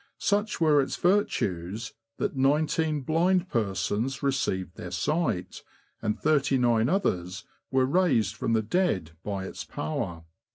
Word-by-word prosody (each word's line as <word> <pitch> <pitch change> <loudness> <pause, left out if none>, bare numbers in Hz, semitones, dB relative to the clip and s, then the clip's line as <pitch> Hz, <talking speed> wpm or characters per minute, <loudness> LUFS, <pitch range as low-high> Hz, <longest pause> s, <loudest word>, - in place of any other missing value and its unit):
Such 205 +1 0
were 155 -3 +5
its 135 - -2
virtues, 110 - 0 0.2
that - - -2
nineteen 150 +3 +1
blind 170 +6 +2
persons 105 +5 -1
received 95 -10 -1
their 90 - -7
sight, 90 - -1 0.4
and 110 -1 -1
thirty 140 -3 +2
nine 120 -1 +3
others 95 - -1 0.3
were 130 -1 +3
raised 130 - +2
from 115 -1 -1
the 110 -1 +2
dead 105 - 0
by 100 -2 -3
its - - -6
power. 80 +2 -4
125 Hz, 130 wpm, -27 LUFS, 95-155 Hz, 0.4 s, were